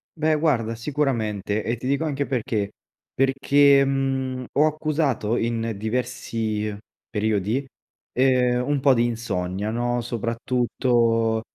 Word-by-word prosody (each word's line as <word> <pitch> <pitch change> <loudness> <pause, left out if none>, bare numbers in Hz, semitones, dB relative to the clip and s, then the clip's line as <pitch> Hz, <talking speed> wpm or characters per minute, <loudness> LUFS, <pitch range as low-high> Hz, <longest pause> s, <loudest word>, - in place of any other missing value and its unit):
Beh 155 0 +1
guarda, 130 -8 +1
sicuramente 110 -6 -1
e 115 +2 -1
ti 125 - -9
dico 140 +3 +1
anche 140 -2 -1
perché. 115 -6 -2 0.4
Perché, 140 +1 +4
mhmm, 135 -1 -1
ho 150 +2 +4
accusato 150 -7 0
in 115 -1 -1
diversi 110 -1 -2 0.3
periodi, 110 +4 0 0.5
ehm, 125 -1 +2
un 145 -1 +1
po’ 135 0 +5
di 120 0 +3
insonnia, 105 -4 -2
no, 120 +1 -1
soprattutto 115 -1 0
120 Hz, 115 wpm, -24 LUFS, 110-135 Hz, 0.5 s, po